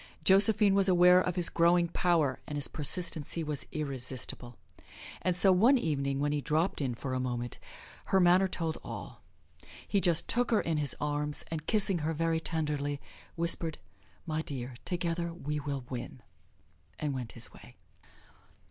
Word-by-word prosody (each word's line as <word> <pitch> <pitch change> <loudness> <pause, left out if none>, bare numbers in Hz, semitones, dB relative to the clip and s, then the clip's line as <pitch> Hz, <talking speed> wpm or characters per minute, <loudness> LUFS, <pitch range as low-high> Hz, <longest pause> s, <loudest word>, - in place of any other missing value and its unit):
Josephine 205 +1 +5
was 195 0 +4
aware 180 0 +6
of 180 -1 -2
his 175 -2 +1
growing 170 +1 +3
power, 165 -6 +1
and 150 - -4
his 145 - +1
persistency 160 +1 0
was 150 -2 -4
irresistible; 130 -4 -5 0.6
and 180 -1 0
so 190 +1 +6
one 230 +9 +5
evening 140 - -1
when 145 +1 0
he 150 -1 -1
dropped 155 +4 0
in 130 -4 -2
for 130 +2 -5
a 130 - -1
moment, 120 -2 -4 0.5
her 195 - +2
manner 180 +1 +5
told 165 -3 -3
all. - - -8 0.7
He 200 - +1
just 170 -3 +2
took 245 +1 +2
her 225 - +3
in 165 -2 -1
his 145 -3 0
arms, 150 0 +1
and 160 -2 -5
kissing 195 -4 +4
her 160 +1 -2
very 165 +1 0
tenderly 150 -3 -2 0.4
whispered, 165 -1 +1 0.5
"My 155 -1 -2
dear, 130 -4 -6
together 170 -1 -2
we 150 -3 -4
will 140 -3 -5
win," 125 0 -7 0.7
and 150 -2 -2
went 125 -3 -6
his 120 - -6
way. - - -15
160 Hz, 160 wpm, -30 LUFS, 140-180 Hz, 0.7 s, aware